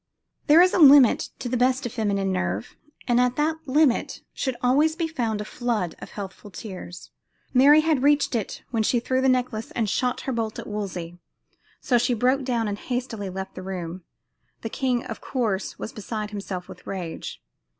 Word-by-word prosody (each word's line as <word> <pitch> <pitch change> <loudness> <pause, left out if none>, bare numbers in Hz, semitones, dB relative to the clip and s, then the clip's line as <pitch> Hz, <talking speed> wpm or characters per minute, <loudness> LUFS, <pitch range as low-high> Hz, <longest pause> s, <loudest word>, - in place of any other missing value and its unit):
There 320 +3 +8
is 365 - +3
a - - +2
limit 280 -5 +7
to - - -5
the 245 - -1
best 255 +2 +2
of 240 - -4
feminine 200 -4 0
nerve, 95 - -2 0.3
and 245 0 +4
at 250 0 +1
that 315 +2 +1
limit 280 -1 +2
should 260 -2 -2
always 290 +6 +3
be 330 -1 -1
found 235 -9 -2
a - - -5
flood 225 -8 -2
of - - -9
healthful 200 0 -8
tears. 185 -3 -9 0.4
Mary 285 +4 +7
had 310 -4 +1
reached 285 0 +3
it 225 -5 -3
when 230 -3 +1
she 235 +3 +2
threw 255 +2 0
the 265 - +3
necklace 250 -3 0
and 225 -3 -1
shot 250 +4 0
her 265 - -3
bolt 225 -3 -2
at - - -6
Wolsey, 180 -5 -5 0.6
so 245 -2 +2
she 245 +1 +1
broke 255 +4 +2
down 235 -3 0
and 205 0 -3
hastily 245 -5 -4
left 190 +1 -6
the 185 - -8
room. 185 -1 -6 0.6
The 225 - -3
king, 250 -1 0
of 225 -3 -7
course, 220 -7 -2
was 230 - -6
beside 215 -2 -5
himself 195 -3 -5
with - - -13
rage. 180 -4 -5
235 Hz, 190 wpm, -25 LUFS, 200-260 Hz, 0.6 s, There